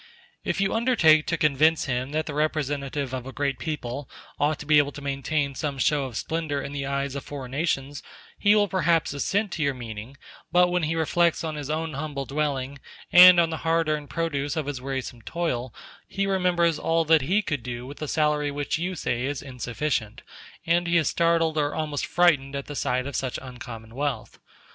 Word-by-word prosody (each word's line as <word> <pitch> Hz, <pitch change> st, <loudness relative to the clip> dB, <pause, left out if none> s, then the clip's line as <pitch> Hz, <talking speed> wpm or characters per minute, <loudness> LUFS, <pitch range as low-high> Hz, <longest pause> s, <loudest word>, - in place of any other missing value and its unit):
*h -, -, -5 dB
If -, -, 0 dB
you 195 Hz, 0 st, +1 dB
undertake 200 Hz, -11 st, +4 dB
to 165 Hz, -, 0 dB
convince 155 Hz, +2 st, +3 dB
him 125 Hz, 0 st, -2 dB
that 155 Hz, +2 st, -1 dB
the 150 Hz, -, -5 dB
representative 145 Hz, -3 st, -1 dB
of 130 Hz, 0 st, -4 dB
a -, -, -6 dB
great 140 Hz, 0 st, -2 dB
people 145 Hz, -3 st, -4 dB, 0.3 s
ought 150 Hz, +1 st, +2 dB
to -, -, -9 dB
be 150 Hz, 0 st, +6 dB
able 145 Hz, -1 st, +1 dB
to -, -, -8 dB
maintain 140 Hz, +1 st, -1 dB
some 140 Hz, 0 st, -3 dB
show 140 Hz, +1 st, +2 dB
of 120 Hz, -4 st, -6 dB
splendor 160 Hz, -3 st, -2 dB
in 140 Hz, -, -5 dB
the 140 Hz, -1 st, -4 dB
eyes 140 Hz, 0 st, -2 dB
of 140 Hz, -, -5 dB
foreign 135 Hz, -3 st, -7 dB
nations, 140 Hz, -1 st, -2 dB, 0.3 s
he 205 Hz, 0 st, +4 dB
will 205 Hz, -1 st, +4 dB
perhaps 170 Hz, -5 st, +1 dB
assent 195 Hz, +8 st, 0 dB
to 165 Hz, -, -4 dB
your 140 Hz, -2 st, +1 dB
meaning; 115 Hz, +2 st, -8 dB, 0.3 s
but 180 Hz, 0 st, +5 dB
when 180 Hz, 0 st, +1 dB
he 160 Hz, +1 st, -1 dB
reflects 170 Hz, +1 st, +2 dB
on 160 Hz, -1 st, -3 dB
his 145 Hz, -2 st, -6 dB
own 160 Hz, +1 st, -2 dB
humble 140 Hz, -1 st, -4 dB
dwelling, 140 Hz, -1 st, -2 dB, 0.3 s
and 180 Hz, 0 st, +10 dB
on 165 Hz, -1 st, +3 dB
the 160 Hz, -, -2 dB
hard 165 Hz, 0 st, +1 dB
earned 150 Hz, -2 st, -2 dB
produce 145 Hz, -1 st, -2 dB
of 155 Hz, -, -1 dB
his 140 Hz, -3 st, -4 dB
wearisome 130 Hz, -3 st, -5 dB
toil, 130 Hz, -3 st, -3 dB, 0.4 s
he 195 Hz, 0 st, -1 dB
remembers 180 Hz, -4 st, +2 dB
all 165 Hz, 0 st, +1 dB
that 160 Hz, 0 st, +5 dB
he 190 Hz, +10 st, +1 dB
could 145 Hz, -8 st, -2 dB
do 120 Hz, +1 st, -6 dB
with 140 Hz, +4 st, -10 dB
a 155 Hz, -, -3 dB
salary 150 Hz, -1 st, +1 dB
which 145 Hz, +2 st, -2 dB
you 180 Hz, +2 st, -2 dB
say 120 Hz, -6 st, -2 dB
is 145 Hz, -1 st, -4 dB
insufficient, 125 Hz, -3 st, -3 dB, 0.4 s
and 170 Hz, +1 st, +2 dB
he 170 Hz, 0 st, +3 dB
is 165 Hz, -, +2 dB
startled 165 Hz, -2 st, +2 dB
or 145 Hz, 0 st, 0 dB
almost 150 Hz, -2 st, -2 dB
frightened 145 Hz, -6 st, +3 dB
at 140 Hz, -, -4 dB
the 145 Hz, -, -7 dB
sight 130 Hz, -1 st, 0 dB
of 140 Hz, -2 st, -5 dB
such 130 Hz, -1 st, -2 dB
uncommon 120 Hz, -3 st, -9 dB
wealth. 135 Hz, -4 st, -3 dB
145 Hz, 205 wpm, -25 LUFS, 135-165 Hz, 0.4 s, and